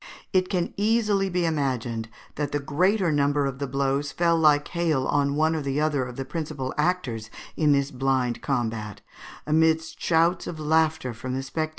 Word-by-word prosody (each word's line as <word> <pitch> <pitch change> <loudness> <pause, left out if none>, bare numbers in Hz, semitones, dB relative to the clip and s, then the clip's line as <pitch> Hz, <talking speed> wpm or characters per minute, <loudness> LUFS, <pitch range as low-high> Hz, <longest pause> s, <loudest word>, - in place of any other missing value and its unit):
It 185 -1 +2
can 180 -3 -1
easily 210 -2 +2
be 180 -1 0
imagined 125 -7 -1 0.2
that 145 -1 -3
the 145 - 0
greater 180 +6 +1
number 145 -1 +2
of 135 -1 -4
the 140 - -2
blows 140 +2 -1
fell 170 -1 +2
like 150 -2 +3
hail 165 -6 0
on 140 -1 +1
one 155 +2 +2
or - - -1 0.2
other 150 -4 +1
of 125 0 -8
the 135 - -4
principal 150 -3 -4
actors 150 -10 -1 0.3
in 150 -2 +3
this 140 0 +2
blind 130 -2 0
combat, 115 -6 -2 0.4
amidst 160 +1 +1
shouts 170 +1 +2
of 160 - -6
laughter 155 -4 +1
from 130 +3 -5
the 135 - -3
spectators. 155 +4 -2
145 Hz, 175 wpm, -25 LUFS, 135-165 Hz, 0.4 s, like